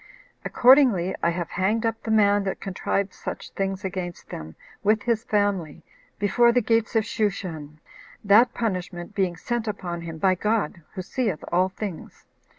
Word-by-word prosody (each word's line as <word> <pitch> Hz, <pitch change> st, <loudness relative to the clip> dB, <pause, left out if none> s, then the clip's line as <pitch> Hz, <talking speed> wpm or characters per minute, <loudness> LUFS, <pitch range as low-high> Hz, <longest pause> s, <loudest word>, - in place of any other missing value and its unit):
Accordingly, 245 Hz, -9 st, +5 dB
I 170 Hz, -, +3 dB
have 170 Hz, 0 st, -3 dB
hanged 210 Hz, +5 st, 0 dB
up 225 Hz, 0 st, -1 dB
the -, -, -6 dB
man 205 Hz, -2 st, +4 dB
that 190 Hz, -, -3 dB
contrived 195 Hz, 0 st, -2 dB
such -, -, -7 dB
things 195 Hz, 0 st, -3 dB
against 180 Hz, -2 st, -5 dB
them, 80 Hz, 0 st, -8 dB, 0.3 s
with 215 Hz, +1 st, +2 dB
his 230 Hz, -2 st, 0 dB
family, 200 Hz, -7 st, -1 dB, 0.3 s
before 235 Hz, +4 st, +4 dB
the 245 Hz, -, +3 dB
gates 230 Hz, 0 st, +1 dB
of 220 Hz, -1 st, +3 dB
Shushan; 180 Hz, -9 st, -3 dB, 0.4 s
that 215 Hz, +4 st, +6 dB
punishment 180 Hz, -6 st, -4 dB
being 190 Hz, -3 st, 0 dB
sent 235 Hz, +4 st, -3 dB
upon 175 Hz, -5 st, -4 dB
him 165 Hz, -1 st, -7 dB
by 185 Hz, +3 st, +3 dB
God, 205 Hz, -3 st, -1 dB
who 185 Hz, -, -4 dB
seeth 215 Hz, -, -2 dB
all 185 Hz, +2 st, +3 dB
things. 190 Hz, -3 st, -7 dB
200 Hz, 155 wpm, -25 LUFS, 180-220 Hz, 0.4 s, that